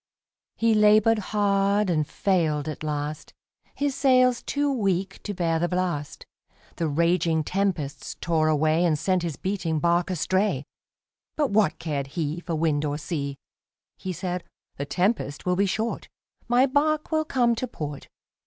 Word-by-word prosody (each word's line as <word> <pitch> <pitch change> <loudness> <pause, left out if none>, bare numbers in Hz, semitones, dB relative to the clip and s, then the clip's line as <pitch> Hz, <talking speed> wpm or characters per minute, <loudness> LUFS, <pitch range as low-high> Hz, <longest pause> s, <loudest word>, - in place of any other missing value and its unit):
He 230 0 +2
labored 215 +1 +5
hard 200 0 +2
and 155 -4 +1
failed 160 -6 0
at 155 - -5
last, 150 0 -4 0.4
His 285 -1 0
sails 255 -3 +3
too 285 0 0
weak 195 -5 -1
to 205 - -4
bear 165 -2 0
the 175 - +1
blast, 180 -5 -2 0.5
The 165 - 0
raging 165 +1 +2
tempests 165 -7 -2
tore 160 -2 +1
away 155 +2 +2
And 165 -3 +2
sent 185 +4 +1
his 170 -4 -3
beating 185 -5 -2
bark 170 +3 +2
astray. 185 -3 0 0.7
But 295 -6 0
what 200 -5 +3
cared 145 -4 -3
he 160 0 -1
For 170 -1 -4
wind 155 -2 +1
or 145 -1 -1
sea! 140 -3 -4 0.6
He 185 - -5
said, 180 0 -3 0.3
"The 140 - -3
tempest 180 -5 -1
will 180 0 +2
be 200 +2 +2
short, 220 +4 -2 0.4
My 245 +2 +4
bark 300 +3 +1
will 315 0 +2
come 245 -5 +2
to 255 +2 -3
port." 145 - -6
180 Hz, 155 wpm, -25 LUFS, 155-210 Hz, 0.7 s, labored